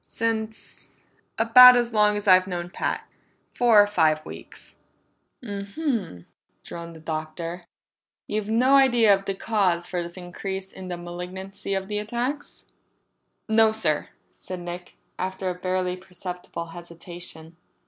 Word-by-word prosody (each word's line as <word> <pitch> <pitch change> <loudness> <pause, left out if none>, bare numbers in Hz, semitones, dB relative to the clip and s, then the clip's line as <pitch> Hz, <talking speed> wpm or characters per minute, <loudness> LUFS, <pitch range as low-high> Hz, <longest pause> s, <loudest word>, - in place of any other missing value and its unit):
"Since 220 -1 -4 0.4
about 250 +3 +9
as 240 -1 0
long 210 -1 +4
as 205 - -6
I've 185 0 +6
known 175 -1 -4
Pat. - - -3 0.5
Four 235 -3 +5
or - - +1
five 160 -6 +2
weeks." - - -10 0.7
"M 200 -3 -5
m," 225 - -2 0.4
droned 170 -1 -8
the - - -11
Doctor. 160 +2 -5 0.6
"You've 210 0 -3
no 250 +5 +3
idea 240 -6 +5
of 195 0 -1
the 195 - -2
cause 190 -5 0
for 175 0 -3
this 170 +1 -8
increase 190 +2 -6
in 185 - -9
the 175 -1 -4
malignancy 185 +3 -6
of 190 0 -3
the 210 0 -2
attacks?" 240 +7 -4 0.8
"No 220 0 +5
sir," 170 -9 -1 0.3
said 185 -1 -6
Nick, 175 0 -8 0.2
after 190 0 -2
a - - -3
barely 185 0 -2
perceptible 180 -2 -7
hesitation. 170 -1 -9
190 Hz, 140 wpm, -25 LUFS, 175-220 Hz, 0.8 s, about